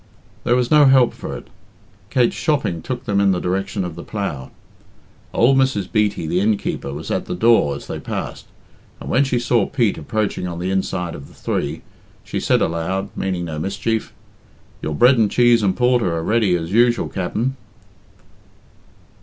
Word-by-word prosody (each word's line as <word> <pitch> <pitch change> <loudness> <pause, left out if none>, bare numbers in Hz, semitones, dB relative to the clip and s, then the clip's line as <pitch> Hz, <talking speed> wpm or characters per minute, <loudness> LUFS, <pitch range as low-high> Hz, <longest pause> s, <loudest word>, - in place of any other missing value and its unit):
There 120 - +3
was 125 -1 0
no 150 -1 +7
help 130 -2 +5
for - - -6
it. - - -12 0.6
Kate's 120 0 +2
shopping 135 - 0
took 125 +8 -5
them 100 -3 +1
in 100 - +4
the 90 - -1
direction 95 +2 -2
of 90 - -5
the 85 - -8
"Plough." 85 -11 -4 0.8
Old 130 +3 +4
Mrs. 130 -8 +1
Beatty, 105 -6 +1
the 85 +3 0
innkeeper, 100 -8 -1
was 75 +3 -6
at - - -1
the - - -4
door 90 -8 +3
as 70 - -9
they - - -5
passed, - - -5 0.5
and - - -6
when 135 - +4
she 130 -3 0
saw 120 -3 +1
Pete 120 -7 0
approaching 105 -4 -2
on 85 -1 -5
the 90 +2 -2
inside 90 -2 -2
of 70 - -9
the - - -18
three, - - -3 0.4
she - - -4
said - - +2
aloud 95 +4 -2
meaning 90 -2 -2
no 80 -2 -5
mischief 105 +5 -2 0.7
"Your 75 - -3
bread 125 - +5
and 110 -2 +3
cheese 120 0 +4
and 95 -2 +1
porter 125 -6 +2
are 80 - -2
ready, 105 -2 +2
as 85 0 -4
usual, 120 +1 +3
Capt'n." 110 +8 -2
100 Hz, 180 wpm, -20 LUFS, 90-120 Hz, 0.8 s, no